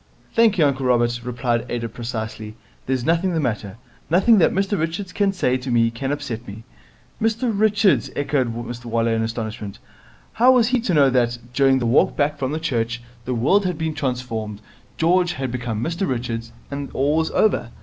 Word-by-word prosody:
'Thank 225 -3 +4
you, 160 - +5
uncle 135 -2 0
Robert,' 120 -1 +2
replied 120 -1 -1
Ada 115 -1 -2
precisely, 110 -2 -6 0.3
'there's 130 -2 -1
nothing 170 +3 +1
the - - +1
matter. 110 -7 -3 0.3
Nothing 195 +6 +5
that - - +5
Mr 195 +2 0
Richards 165 +4 -3
can 200 -1 +2
say 130 -9 0
to 130 +1 -7
me 115 -1 +3
can 135 +4 -3
upset 140 -6 -4
me.' 105 +3 -9 0.6
'Mr 225 +2 +1
Richards!' 210 -1 +3
echoed 140 -4 0
Mr 120 +1 -7
Waller 115 0 0
in 110 - 0
astonishment. 110 -3 -4 0.6
How 245 +3 +5
was 240 -3 +4
he 255 0 +2
to 210 -7 0
know 140 -3 +5
that, 120 -1 +1 0.2
during 135 0 +4
the 125 - -1
walk 115 +4 +3
back 145 0 0
from 140 +4 -2
church, 120 -5 -2 0.2
the 125 - -2
world 150 - +3
had 180 -3 -2
been 160 -1 -2
transformed, 125 -7 -3 0.4
George 175 +2 +2
had 130 -4 -4
become 120 -3 -3
Mr 170 +3 -2
Richards, 115 -2 -3 0.2
and 140 0 -4
all 145 +3 +1
was 160 0 +1
over? 210 - +1
130 Hz, 185 wpm, -22 LUFS, 115-170 Hz, 0.6 s, you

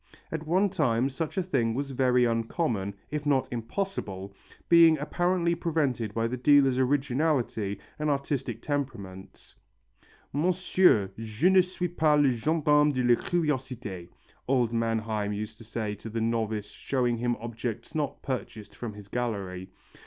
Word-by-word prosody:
At 160 -1 -4
one 190 +5 +3
time 135 -7 +1
such 160 +7 -4
a 190 - +2
thing 120 -10 0
was 140 +1 -3
very 125 -1 +3
uncommon, 115 - -1 0.2
if 150 -1 -2
not 140 -3 +2
impossible, 115 - -4 0.3
being 165 -2 +7
apparently 170 +3 0
prevented 150 -10 -1
by 115 0 +1
the 125 +2 -2
dealer's 135 -1 +4
originality 130 -6 0 0.2
and 150 0 0
artistic 135 -4 -2
temperament. 115 -10 -5 0.8
"Monsieur, 175 - +3
je 115 - +1
ne 190 -1 +7
suis 180 0 -3
pas 155 -3 +2
le 140 -2 +4
gendarme 150 +3 +3
de 130 -2 -1
la 120 0 +5
curiosité," 130 - -2 0.4
old 125 -3 +2
Manheim 110 -2 -1
used 110 +2 -6
to - - -11
say 110 -1 -3
to 105 +2 -8
the 115 +1 -3
novice 110 -2 -1
showing 125 0 -1
him 120 +1 0
objects 115 0 -5
not 150 -2 -3
purchased 115 -5 -5
from 115 -3 -6
his 105 -1 -12
gallery. 100 -6 -3
125 Hz, 145 wpm, -28 LUFS, 110-150 Hz, 0.8 s, being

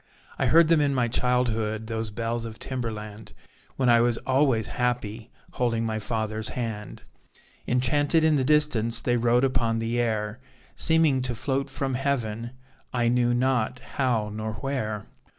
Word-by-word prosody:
I - - +2
heard 165 0 +6
them 165 -2 +4
in 140 -1 +1
my 125 -2 +2
childhood, 115 -3 0
Those 110 0 -3
bells 115 +2 -3
of 110 -1 -7
Timberland, 110 -4 -5 0.4
When 130 - 0
I 120 -1 +6
was 120 -1 +2
always 130 -5 +2
happy, 120 -2 -2 0.2
Holding 115 -2 0
my 110 -1 -2
father's 110 0 -3
hand. 110 -4 -5 0.6
Enchanted 145 +6 +2
in 160 -1 +4
the 135 - +2
distance, 130 -6 +2
They 120 - 0
rode 120 +1 +3
upon 115 -4 +1
the 115 +1 -1
air, 110 -1 -1 0.4
Seeming 160 -5 +3
to 125 -1 -1
float 135 +3 -2
from 135 0 -3
Heaven; 120 -4 -2 0.4
I 120 -2 +1
knew 120 0 +2
not 125 -2 +1
how 125 -5 -1
nor 110 0 -4
where. 110 -3 -3
120 Hz, 150 wpm, -26 LUFS, 110-130 Hz, 0.6 s, heard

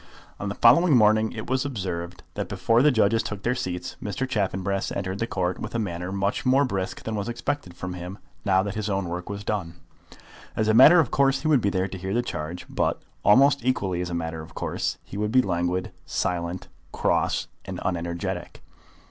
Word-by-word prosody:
On 105 - -3
the 100 - -4
following 140 +5 +6
morning 110 0 +4
it 110 -2 -6
was 130 0 +1
observed 90 -9 -4
that - - -4
before 115 +1 +2
the 150 - +6
judges 110 -3 +3
took 105 -3 -6
their 120 - +2
seats 90 -7 -4
Mr. 110 +5 -2
Chaffanbrass 100 -4 -1
entered 95 0 -3
the 115 - -1
Court 90 -3 -1
with - - -6
a - - +2
manner 90 -4 -3
much 100 +1 -1
more 135 +3 +4
brisk 95 -6 -3
than 110 - -4
was 105 +1 -2
expected 120 -5 -3
from 95 -1 -5
him 90 +2 -7 0.3
now 95 -2 +3
that 100 -1 -3
his 110 0 -3
own 95 -2 -1
work 90 +2 -5
was 100 0 -5
done. 95 -6 -3 0.8
As 110 - +1
a 110 - +4
matter 150 +9 +9
of 155 - +2
course 135 -1 +3
he - - 0
would 145 -5 +4
be 100 - +2
there 95 -1 0
to 95 0 -7
hear 95 +3 -3
the 120 - +2
charge, 85 -4 -5
but, - - 0 0.2
almost 135 +4 +5
equally 100 -8 0
as 90 - -3
a 85 - -3
matter 80 -1 -3
of 80 - -12
course, - - -2
he 100 - -9
would 105 +1 -1
be 130 +1 +5
languid, 90 0 -1 0.2
silent, 90 0 -2 0.2
cross, - - +1 0.2
and - - -5
unenergetic. 85 -1 -3
100 Hz, 205 wpm, -25 LUFS, 90-120 Hz, 0.8 s, matter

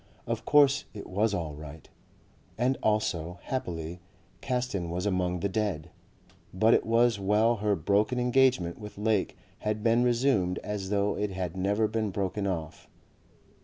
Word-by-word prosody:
Of - - -3
course 145 -1 +4
it 105 - -7
was 105 +4 0
all 85 -7 -3
right. 75 +1 -10 0.7
And 125 +3 +2
also, 90 -5 0
happily, 90 -9 -4 0.4
Caston 125 -9 -2
was 90 +3 -3
among 90 -3 0
the 100 - +1
dead. 95 -6 -2 0.6
But 110 +5 +3
it - - +2
was 115 -1 +3
well 105 +4 +2
her 105 0 +1
broken 105 +8 +1
engagement 125 -8 +2
with 105 -2 -9
Lake 105 -1 0 0.2
had 105 0 -2
been 115 +1 +4
resumed 120 -7 +2
as 105 -2 -4
though 100 0 +1
it 105 0 -1
had 90 -2 -4
never 100 +4 +1
been 110 -1 -1
broken 100 +1 -2
off. 80 -4 -5
105 Hz, 150 wpm, -28 LUFS, 90-115 Hz, 0.7 s, course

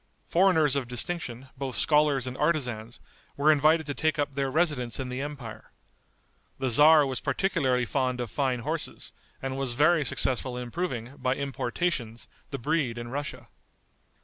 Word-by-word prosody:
Foreigners 160 -6 +3
of 135 -3 -1
distinction, 125 0 -2
both 135 -1 -4
scholars 150 -4 +3
and 125 0 -5
artisans, 125 -7 -1 0.4
were 150 +2 +5
invited 155 +2 +3
to 145 - -3
take 155 +2 0
up 145 -1 -1
their 135 0 -1
residence 140 -6 0
in 130 -1 -3
the 125 +1 -4
empire. 125 -7 -7 0.9
The 130 -1 -1
tzar 150 +4 +7
was 130 -2 -2
particularly 135 -10 0
fond 130 0 -1
of 120 -4 -4
fine 130 -4 0
horses, - - -3 0.3
and 135 0 -3
was 135 -3 -1
very 150 +4 +4
successful 130 -2 0
in 125 - -4
improving, 125 -2 -4
by 130 +1 0
importations, 135 -3 -2 0.2
the 140 - -4
breed 135 -2 -1
in 120 0 -6
Russia. 130 -3 -5
135 Hz, 155 wpm, -27 LUFS, 125-150 Hz, 0.9 s, tzar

